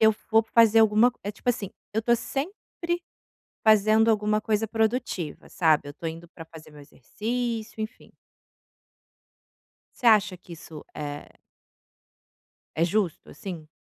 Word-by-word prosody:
eu 220 0 +6 0.2
vou 225 0 +5
fazer 225 0 +5
alguma 220 +2 +5
c - - -28
é 205 - -3
tipo 230 - -8
assim, 205 -5 0 0.2
eu 220 - +2
estou 235 +1 +3
sempre 340 - -4 0.6
fazendo 215 +1 +5
alguma 210 0 +1
coisa 215 0 0
produtiva, 220 - -2
sabe, 160 -5 +2
eu - - -5
estou 165 +3 -5
indo 165 +1 -8
para 165 -1 -11
fazer 160 -1 -14
meu 150 - -13
exercício, 225 - -4
enfim. 215 +3 -7 1.9
Você 245 - -2
acha 210 -4 +5
que 180 -1 -14
isso 155 -2 -10
é 145 -1 -6 1.5
é 165 - +2
justo, 190 -2 -1
assim? 160 -1 -8
215 Hz, 140 wpm, -26 LUFS, 170-225 Hz, 1.9 s, eu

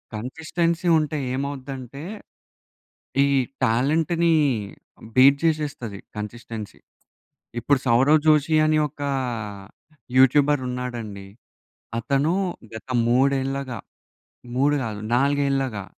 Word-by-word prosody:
Consistency 165 +8 -2
ఉంటే 150 0 -2 0.2
ఏమవుద్దంటే 135 0 -5 1.2
ఈ - - +3 0.4
టాలెంట్‌ని 160 +8 +2 0.8
బీట్ 135 +2 +7
జేసేస్తది 150 -10 -1 0.2
కన్‌సిస్టెన్సీ. 110 0 -7 0.8
ఇప్పుడు 135 +4 +2
'సౌరవ్ 135 +6 +5
జోషి' 155 0 +4
అని 155 0 +3
ఒక 145 0 -12 1.1
యూట్యూబర్ 140 +2 +5
ఉన్నాడండి. 120 -6 -5 0.7
అతను 140 +7 +1 0.4
గత 110 - -9 0.2
మూడేళ్లగా, 135 0 +1 0.8
3 145 +2 +3
కాదు, 105 -2 -5
నాలుగేళ్ళగా 135 -5 +1
135 Hz, 80 wpm, -23 LUFS, 120-150 Hz, 1.2 s, బీట్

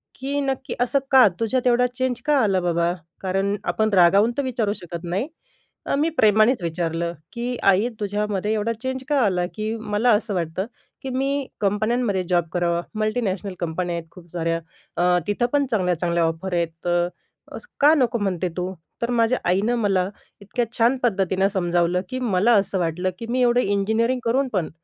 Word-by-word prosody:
की 280 +2 -3
"नक्की 270 -1 -2
असं 250 +3 +2
का? 260 -4 +8
तुझ्यात 245 +3 0
एवढा 245 0 +4
चेंज 255 -1 -1
का 295 -1 +3
आला 195 -3 +2
बाबा?" 170 0 +1 0.3
कारण 195 +2 0
आपण 220 0 +1
रागावून 195 +5 +5
तर 280 - +1
विचारू 235 -5 -1
शकत 170 -4 -8
नाही, 185 +9 -2 0.6
अ, - - 0
मी 300 +4 +2
प्रेमानेच 215 +2 +4
विचारलं, 170 0 -2 0.2
की 245 +1 -3
"आई 200 +4 +4
तुझ्यामध्ये 210 0 -1
एवढा 220 +1 0
चेंज 260 0 -3
का 290 -2 +3
आला? 180 -3 +1
की 215 +1 -2
मला 220 +2 +1
असं 210 0 0
वाटतं 175 +1 -2 0.4
की, 265 - -5
मी 270 +1 -1
कंपन्यांमध्ये 210 0 +1
जॉब 175 -2 +2
करावा, 170 -1 +1 0.2
मल्टिनॅशनल 210 -3 -1
कंपन्या 175 +1 -2
आहेत 170 -1 -6
खूप 175 -2 -15
साऱ्या 165 -1 -1 0.4
अ, 180 0 +3
तिथं 205 +4 +1
पण 285 -1 +3
चांगल्या-चांगल्या 175 -4 +1
ऑफर 165 +3 -2
आहेत. 170 -1 +1 0.2
तर 175 0 +2 0.5
असं - - -13
का 295 +2 +6
नको 250 -5 +2
म्हणते 185 -3 -1
तू?" 180 +1 -2 0.3
तर 235 - -1
माझ्या 235 +1 +2
आईनं 205 +6 +2
मला 195 -4 +1 0.3
इतक्या 235 +4 -2
छान 240 +3 +3
पद्धतीनं 195 -4 +2
समजावलं, 175 -2 +1
की 255 - -3
मला 225 -1 +2
असं 195 -1 -3
वाटलं, 175 +2 -1
की 230 - -5
मी 255 +1 +1
एवढं 245 0 +4
इंजिनिअरिंग 220 +5 +1
करून 260 +4 +2
पण 180 -6 0
205 Hz, 175 wpm, -23 LUFS, 180-240 Hz, 0.6 s, का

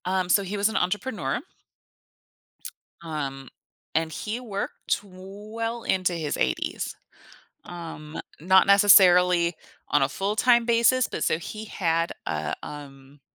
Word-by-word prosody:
Um, 185 -1 0
so 200 - +4
he 195 +2 -4
was 200 +2 +2
an 220 - -6
entrepreneur 210 +8 -2 1.6
um, 140 -5 -5 0.5
and 160 0 +1
he 215 +8 -4
worked 205 -5 -3
well 210 +5 -7
into 185 -1 0
his 160 -4 -3
80s. 65 - -2 0.7
Um, 165 -3 -8 0.2
not 190 +4 +5
necessarily 180 -3 +6 0.4
on 145 - +3
a 135 - +3
full-time 220 - +2
basis, 235 +2 +3
but - - -3
so 160 - +1
he 215 +5 -8
had, 165 -4 -1
uh, 75 0 -2
um 140 -1 -11
185 Hz, 120 wpm, -25 LUFS, 160-210 Hz, 1.6 s, necessarily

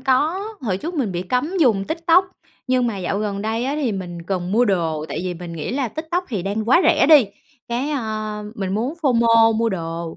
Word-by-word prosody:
có, 305 +10 +1
hồi 200 -7 -1
trước 335 - -5
mình 240 - -1
bị 175 - -2
cấm 255 - -1
dùng 220 -9 +3
TikTok. 335 - +3 0.4
Nhưng 255 -1 +2
mà 210 -4 -3
dạo 190 +2 -2
gần 205 -1 -3
đây 225 +3 -1
á, 275 +2 -1
thì 260 -8 0
mình 175 -3 -6
cần 180 0 -3
mua 240 +4 +4
đồ, 165 -7 0
tại 155 - -4
vì 180 - -3
mình 170 0 -8
nghĩ 165 -2 -4
là 265 -2 -1
TikTok 320 - -3
thì 205 -8 -3
đang 205 +3 -2
quá 340 +8 +6
rẻ - - +4
đi. 290 -9 +7 0.4
Cái, 250 +5 -2
ơ, 215 -5 -3
mình 195 -3 -3
muốn 245 +9 -1
FOMO 230 -4 +4
mua 230 0 +1
đồ, 165 -3 -4
225 Hz, 220 wpm, -21 LUFS, 190-270 Hz, 0.4 s, đi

